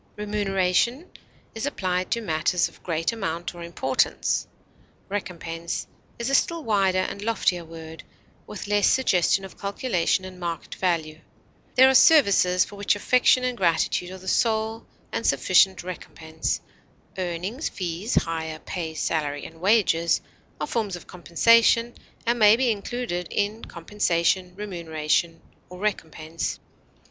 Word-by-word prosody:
Remuneration 210 - 0 0.4
is 225 +5 -3
applied 185 -8 -2
to 235 - 0
matters 170 -1 +1
of - - -18
great 165 +1 -1
amount 175 -6 -4
or 175 - -10
importance. 170 -6 0 0.6
Recompense 170 -4 -4 0.3
is 235 - -3
a 275 - -1
still 335 +3 +2
wider 195 -4 +2
and 185 +2 -2
loftier 205 -5 0
word, 160 0 -10 0.5
with 210 - -7
less 205 -1 +2
suggestion 195 -6 +2
of 190 - -13
calculation 200 -3 0
and 185 -1 -10
market 170 -2 -5
value; 160 -4 -1 0.6
there 260 +1 +8
are 265 - +4
services 200 - +5
for 205 - -12
which 205 0 +1
affection 250 +4 +3
and 250 -1 -1
gratitude 175 -2 +1
are 190 - -8
the 190 0 -13
sole 220 +2 0 0.2
and 230 - -2
sufficient 185 +7 +3
recompense; 160 -3 -4 0.6
earnings, 185 - -3
fees, 185 +3 -3
hire, 160 -1 -4
pay, 160 0 -5
salary, 145 -3 -2
and 165 0 -12
wages 185 -5 +3 0.4
are - - -1
forms 215 -5 -2
of 175 - -10
compensation 230 +7 +3 0.3
and 235 +1 +1
may 210 0 +7
be 245 0 +2
included 205 -4 -3
in 210 +2 -1
compensation, 180 0 0
remuneration, 170 -4 -2 0.3
or 180 - -10
recompense. 165 -5 -3
185 Hz, 135 wpm, -25 LUFS, 170-215 Hz, 0.6 s, there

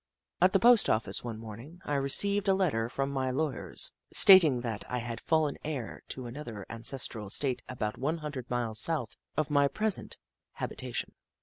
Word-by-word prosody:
At 185 +1 +4
the 195 - +4
post 235 +1 +5
office 110 +1 0
one 115 -2 -5
morning, 115 +10 -10
I 145 - -3
received 200 +9 +2
a 195 - +4
letter 140 -12 0
from 135 +2 -2
my 130 -1 -1
lawyers, 145 +2 -2 0.2
stating 160 -10 +7
that 115 -4 -4
I 125 - -2
had 120 -1 -5
fallen 155 -3 0
heir 140 -7 -5
to 130 - -6
another 120 -5 -8
ancestral 115 -2 -1
estate 130 +5 0
about 110 -4 -4
one 150 +6 -1
hundred 145 -6 -7
miles 115 -3 -1
south 150 -8 +1 0.2
of 155 -1 -1
my 145 -1 +4
present 210 +8 -1 0.4
habita - - -5
tion. - - -3
135 Hz, 175 wpm, -29 LUFS, 115-155 Hz, 0.4 s, stating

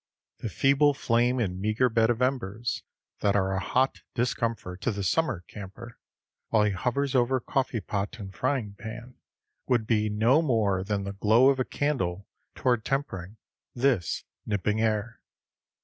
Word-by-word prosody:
The 115 - -4
feeble 140 +4 +3
flame 120 0 +2
and 95 -5 -1
meagre 110 +5 +2
bed 115 -1 +2
of 120 +1 +1
embers 120 -3 -1 0.4
that 100 -1 +2
are 95 -1 +2
a 95 - 0
hot 130 +6 +1
discomfort 115 -6 -2
to 115 - 0
the 100 -3 -2
summer 130 - +1
camper, 115 +4 -10 0.5
while 110 -2 +3
he 105 - +2
hovers 125 +8 -1
over 130 0 +3
coffee 125 -2 -1
pot 100 +4 -3
and 95 -3 -8
frying 130 -5 -1
pan, 115 +3 -9 0.5
would 120 -3 +2
be 110 -2 +1
no 115 +8 +4
more 110 - +1
than 100 0 -1
the 100 0 -4
glow 110 +6 +5
of 135 -1 +2
a 130 - +1
candle 100 -11 -1 0.3
toward 120 -4 +1
tempering 110 - -3 0.4
this 120 -8 +1 0.2
nipping 105 +1 0
air. 110 +1 -1
115 Hz, 155 wpm, -27 LUFS, 100-125 Hz, 0.5 s, glow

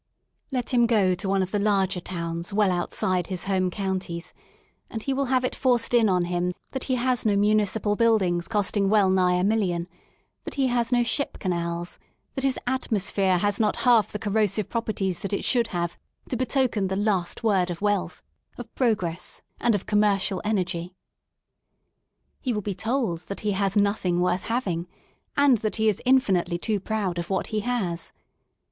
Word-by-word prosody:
Let 255 -2 -2
him 240 -1 +4
go 205 -6 +3
to 190 +2 -3
one 195 -1 +2
of 185 - -5
the 205 - 0
larger 195 -2 +1
towns 170 0 -5
well 200 -1 +3
outside 180 0 0
his 185 -2 -4
Home 190 -2 +1
Counties, 185 -3 -4 0.6
and 225 -1 -5
he 275 - -1
will 275 +1 0
have 255 0 +1
it - - -1
forced 245 -3 +1
in 230 -3 +5
on 180 -2 +2
him 175 0 -1 0.2
that 265 - -3
he 260 - 0
has 250 -1 0
no 205 -2 +2
municipal 210 0 +2
buildings 195 -7 +2
costing 205 -2 +1
well* 205 -3 +4
nigh 180 -1 +3
a 180 - +1
million, 190 -5 0 0.6
that - - -7
he 270 -2 +2
has 240 -1 0
no 245 -1 +4
ship 235 +4 0
canals, 170 -1 -3 0.3
that 270 - -2
his 270 -2 +1
atmosphere 200 -7 0
has 205 +2 0
not 215 -2 +2
half 235 -4 +5
the - - -3
corrosive 210 -1 0
properties 205 -6 -2
that 195 +2 -4
it - - -1
should 240 -3 +2
have 175 -3 -3 0.3
to - - -1
betoken 250 -5 +1
the 190 - -2
last 195 -3 -1
word 195 -5 +2
of 170 -1 -4
wealth, 205 -2 -1 0.3
of - - -9
progress, 185 -9 -1 0.2
and 235 -2 +2
of 200 - -3
commercial 200 -3 +2
energy. 180 -4 -2 1.4
He 255 -4 -1
will 210 -2 -3
be 205 - -2
told 220 -5 -1
that 200 - -5
he 210 - 0
has 195 +1 0
nothing 200 -4 +1
worth 180 +1 0
having, 185 -8 -1 0.5
and 280 -5 +5
that 215 0 -1
he 220 -1 +2
is 210 -3 +2
in 265 +1 +7
finitely 175 -6 -1
too 210 +2 0
proud 195 -4 -2
of 170 - -5
what 190 -1 0
he 215 - +1
has. 205 -7 -2
205 Hz, 185 wpm, -25 LUFS, 180-225 Hz, 1.4 s, in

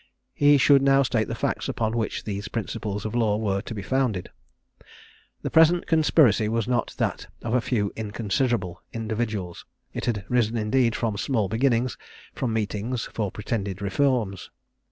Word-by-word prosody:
He 145 0 +5
should 140 +1 +5
now 135 0 +4
state 115 -4 0
the - - -3
facts, - - -2
upon 110 0 -1
which 110 -3 -2
these 100 -1 -4
principles 105 -2 -4
of 110 - -3
law 110 -4 +2
were 100 -3 0
to 115 - -7
be 100 - -5
founded. 125 -5 -1 1.1
The - - -3
present 165 +2 +5
conspiracy 145 - +4
was 115 -1 -1
not 120 -2 -1
that - - -2 0.2
of 115 - -2
a 125 - +3
few 105 -5 -1
inconsiderable 105 -2 -1
individuals; 110 -5 -3 0.3
it - - -4
had 105 -5 -1
risen 120 -2 +1
indeed 115 +2 +2
from 110 -4 -1
small 110 -2 0
beginnings, 120 +1 +1 0.3
from 125 - -2
meetings 110 +2 -2
for 105 -3 -1
pretended 100 -3 -3
reforms. 100 -1 0
115 Hz, 155 wpm, -25 LUFS, 105-125 Hz, 1.1 s, He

